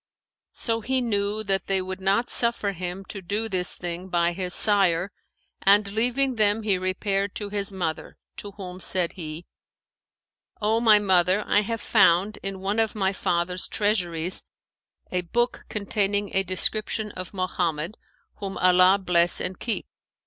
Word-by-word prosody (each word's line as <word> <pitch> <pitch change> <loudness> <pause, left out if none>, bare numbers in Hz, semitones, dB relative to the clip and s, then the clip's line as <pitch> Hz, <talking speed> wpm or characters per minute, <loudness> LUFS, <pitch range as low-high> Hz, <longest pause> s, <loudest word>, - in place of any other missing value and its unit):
So 230 -1 +1
he 260 +4 0
knew 210 -2 -1
that 195 -3 -1
they 195 -1 +1
would 190 +1 -6
not 200 +5 +1
suffer 235 -4 +3
him 185 +1 -6
to 195 - -7
do 205 +5 -2
this 185 -4 0
thing 175 +1 -6
by 170 -1 +2
his 180 0 -4
sire 195 -3 +3 0.5
and 200 +1 +4
leaving 250 +4 +1
them 210 +1 +2
he 200 -4 +1
repaired 195 +1 -1
to 205 -1 -4
his 200 -1 -2
mother, 170 -5 -4 0.2
to 205 - -7
whom 185 -2 -8
said 180 -2 +1
he, 160 -1 -7 1.1
'O 220 +2 +1
my 220 -2 +6
mother, 190 0 +2
I 205 - +3
have 225 +1 -4
found, 195 0 +3
in 195 -1 -5
one 200 +3 -1
of 220 -1 +1
my 195 -2 0
father's 180 0 -1
treasuries, 180 -5 -1 0.7
a 180 - 0
book 240 +8 -1
containing 205 -1 -1
a 195 - +4
description 210 +3 -1
of 185 -2 -8
Mohammed 180 -2 -2 0.4
(whom 195 -2 -5
Allah 185 +1 +5
bless 175 -3 +2
and 180 0 -4
keep!) 230 - -2
195 Hz, 155 wpm, -25 LUFS, 180-210 Hz, 1.1 s, my